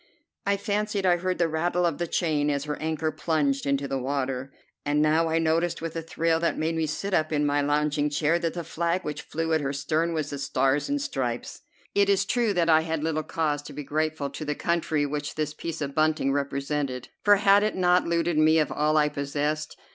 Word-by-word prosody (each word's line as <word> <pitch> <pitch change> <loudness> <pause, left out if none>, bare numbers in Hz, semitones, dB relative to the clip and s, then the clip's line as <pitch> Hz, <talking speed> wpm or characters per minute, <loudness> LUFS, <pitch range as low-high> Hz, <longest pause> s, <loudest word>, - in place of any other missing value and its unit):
I 200 0 +2
fancied 205 0 -1
I 175 -1 +4
heard 185 +1 -2
the 170 - +2
rattle 175 +3 0
of 170 -3 -1
the 175 - -1
chain 155 -4 0
as 140 -1 0
her 150 0 -3
anchor 155 0 -1
plunged 150 -3 0
into 140 0 0
the 135 0 -2
water, 130 0 -2 0.3
and 145 +1 +1
now 155 +2 +3
I 160 - +1
noticed 165 +1 +1
with 165 0 -5
a 165 - -2
thrill 165 0 0
that 170 - 0
made 160 +1 0
me 160 -1 0
sit 195 +6 -3
up 155 -2 +1
in 150 -1 +1
my 145 0 +2
lounging 150 0 +1
chair 155 +3 +1
that 165 -1 -2
the 170 - -3
flag 170 +3 -1
which 150 - -4
flew 165 +1 -2
at 160 - +2
her 140 -1 -1
stern 155 +4 -1
was 150 -2 -2
the 140 - -5
Stars 135 - +1
and 285 0 0
Stripes. 130 - -3 0.3
It 200 0 +3
is 195 -1 +3
true 235 +1 +1
that 175 -4 +1
I 160 -1 +5
had 160 -1 -3
little 160 -1 0
cause 155 -2 -1
to - - -10
be 150 - -6
grateful 150 0 -2
to 145 - -6
the 150 -1 -2
country 160 -3 0
which 145 +1 -4
this 155 -1 -2
piece 165 +1 -6
of 140 -1 -3
bunting 155 -3 +2
represented, 140 -2 -2
for 205 0 +7
had 200 0 +5
it 215 +1 0
not 180 -1 +3
looted 170 -1 +1
me 155 +1 +5
of 155 -2 +1
all 155 +1 +1
I 150 -1 +4
possessed? 150 +2 -2
155 Hz, 225 wpm, -26 LUFS, 145-170 Hz, 0.3 s, for